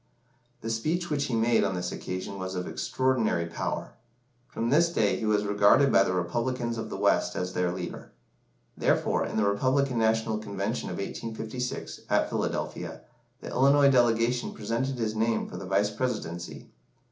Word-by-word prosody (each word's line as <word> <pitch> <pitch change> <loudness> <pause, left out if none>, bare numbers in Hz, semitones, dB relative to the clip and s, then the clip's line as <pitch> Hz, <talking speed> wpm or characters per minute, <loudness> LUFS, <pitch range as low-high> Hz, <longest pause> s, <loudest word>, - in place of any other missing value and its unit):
The 115 - -3
speech 160 +10 -1
which 140 -1 +1
he 130 - -1
made 115 +1 +3
on 95 -2 0
this 90 0 -3
occasion 95 +1 -5
was 95 0 -4
of 90 0 -3
extraordinary 120 -10 0
power. 85 - -4 0.6
From 115 -2 -2
this 170 +4 +5
day 110 -11 +2
he 110 - -2
was 105 -1 +2
regarded 105 +7 +5
by - - +6
the - - -1
Republicans 115 +6 -1
of - - -5
the - - -5
West - - +2
as 90 0 -3
their 90 -1 +1
leader. 90 -1 -6 0.6
Therefore, - - +1
in - - -4
the 110 - +3
Republican 130 +5 +1
National 110 0 +1
Convention 100 +2 -3
of 90 - -4
1856, 115 +4 -5
at - - +2
Philadelphia, - - -3 0.4
the - - -7
Illinois 140 +2 +5
delegation 120 -1 +2
presented 115 +5 -2
his 110 -2 -1
name 115 +1 0
for - - -8
the 95 - -7
Vice 100 +2 +2
Presidency. 85 - -4
110 Hz, 165 wpm, -28 LUFS, 100-125 Hz, 0.6 s, by